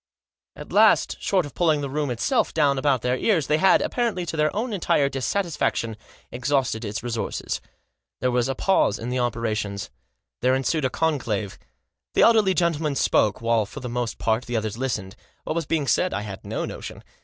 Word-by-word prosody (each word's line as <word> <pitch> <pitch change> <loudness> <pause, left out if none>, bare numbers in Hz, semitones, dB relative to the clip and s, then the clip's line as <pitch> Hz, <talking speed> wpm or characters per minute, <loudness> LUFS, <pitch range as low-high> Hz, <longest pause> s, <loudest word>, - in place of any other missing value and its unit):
At - - -10
last, - - +4
short 185 -4 +1
of 145 - -10
pulling 160 -4 +2
the 140 - -3
room 150 0 -1
itself 120 -2 0
down 140 -2 +3
about 135 -3 +1
their 125 0 +1
ears, 165 - +1
they 150 +3 +1
had, 190 +2 +5
apparently 230 -8 -1
to 165 - -4
their 155 0 +2
own 225 +2 -2
entire 150 -7 +2
dissatisfaction, 140 - -1 0.4
exhausted 125 -2 0
its 105 +1 -4
resources. 115 -2 -3 0.6
There 125 - +1
was 125 +1 +1
a 135 - -1
pause 190 - +2
in 115 - -5
the 125 +1 -1
operations. 110 -4 -2 0.5
There 130 +1 +3
ensued 135 +2 0
a - - +2
conclave. 120 -10 -1 0.6
The - - +5
elderly 215 -5 +5
gentleman 160 -4 +1
spoke, 105 -5 +2
while, 115 -2 +2
for - - -9
the 125 - -6
most 120 -1 -3
part, 110 +2 0
the 120 -1 -1
others 110 -1 -2
listened. 115 -7 -3 0.3
What 155 - -3
was 165 -4 -2
being 155 -3 0
said 180 +9 +1
I 105 - -2
had 100 -2 -7
no - - -3
notion. - - -8
130 Hz, 190 wpm, -24 LUFS, 115-160 Hz, 0.6 s, had